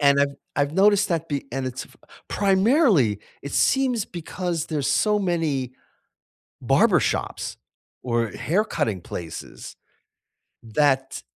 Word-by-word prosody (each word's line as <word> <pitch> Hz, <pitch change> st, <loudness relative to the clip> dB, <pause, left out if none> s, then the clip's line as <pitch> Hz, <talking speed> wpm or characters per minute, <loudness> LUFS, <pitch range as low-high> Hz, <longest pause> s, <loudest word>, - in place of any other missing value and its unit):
And 140 Hz, -1 st, +5 dB
I've 140 Hz, 0 st, +1 dB, 0.2 s
I've 145 Hz, +1 st, +1 dB
noticed 200 Hz, +2 st, +4 dB
that 165 Hz, -2 st, -1 dB
the 140 Hz, -2 st, -3 dB
and 135 Hz, 0 st, -2 dB
it's 130 Hz, 0 st, -5 dB
f -, -, -22 dB, 0.3 s
primarily, 195 Hz, -, +3 dB, 0.2 s
it 140 Hz, -, -7 dB
seems 255 Hz, -5 st, +2 dB
because 170 Hz, -1 st, -4 dB
there's 150 Hz, -4 st, -2 dB
so 210 Hz, +8 st, +2 dB
many 160 Hz, -, -1 dB, 0.9 s
barber -, -, +4 dB
shops -, -, -2 dB, 0.5 s
or 115 Hz, -2 st, 0 dB
hair 185 Hz, -, 0 dB
cutting 115 Hz, -, -2 dB
places 85 Hz, -1 st, -8 dB, 0.9 s
that 135 Hz, +3 st, 0 dB
150 Hz, 120 wpm, -24 LUFS, 135-195 Hz, 0.9 s, And